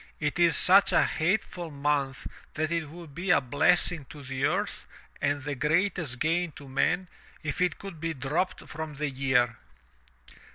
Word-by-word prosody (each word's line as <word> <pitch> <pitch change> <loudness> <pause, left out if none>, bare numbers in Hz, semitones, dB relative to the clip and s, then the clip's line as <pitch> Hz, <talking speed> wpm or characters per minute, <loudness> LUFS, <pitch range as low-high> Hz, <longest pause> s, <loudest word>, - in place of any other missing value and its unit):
It 150 +2 -1
is 170 -3 +5
such 195 +2 +6
a - - +5
hateful 175 0 -1
month 140 -2 -1 0.3
that 155 +1 -1
it 165 -3 -1
would 165 -2 -11
be 180 +6 -4
a 170 - +6
blessing 155 +4 +2
to 145 -2 -10
the 130 0 -2
earth - - -1 0.3
and 145 0 +1
the 145 0 -3
greatest 155 -1 0
gain 165 +4 0
to 140 - -12
men 175 +7 +1 0.4
if 150 +2 -3
it 180 - +2
could 195 -5 -9
be 165 0 -2
dropped 145 +7 -1
from 155 -1 -6
the 145 0 -2
year. 125 -3 +2
155 Hz, 165 wpm, -28 LUFS, 140-175 Hz, 0.4 s, such